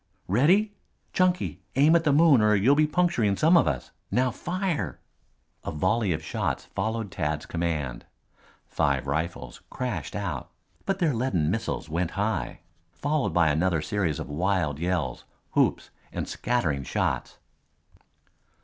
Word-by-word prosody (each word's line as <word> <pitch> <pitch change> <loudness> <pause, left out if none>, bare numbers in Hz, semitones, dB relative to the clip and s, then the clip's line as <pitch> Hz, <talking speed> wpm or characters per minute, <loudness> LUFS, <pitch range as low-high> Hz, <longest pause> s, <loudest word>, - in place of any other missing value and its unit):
"Ready 180 - +3 0.4
Chunky, 185 0 +1
aim 150 +5 +5
at 165 - +3
the 150 - +4
moon 145 -4 +6
or 105 0 +4
you'll 110 +8 +4
be 150 +1 +3
puncturing 150 - +1
some 165 +3 +5
of 130 - +5
us. 65 -5 -2 0.2
Now 125 +4 +2
fire!" 180 - -3 0.6
A - - -4
volley 95 +6 +1
of 80 -1 -2
shots - - -2
followed 110 -3 -3
Tad's 75 0 -2
command. 75 -8 -3 0.6
Five - - 0
rifles 75 -3 -3
crashed 110 - -4
out, - - -4 0.4
but 195 -1 +1
their 165 -6 +1
leaden 110 -11 0
missiles - - -3
went 85 +2 -1
high, 105 +2 -2 0.3
followed 145 - -1
by 85 -3 +4
another 80 +1 +1
series 95 -8 -1
of - - -5
wild 80 -1 0
yells, 85 -7 -1 0.3
whoops - - +1 0.2
and - - -4
scattering 80 - -1
shots. 65 - -2
100 Hz, 140 wpm, -26 LUFS, -, 0.6 s, moon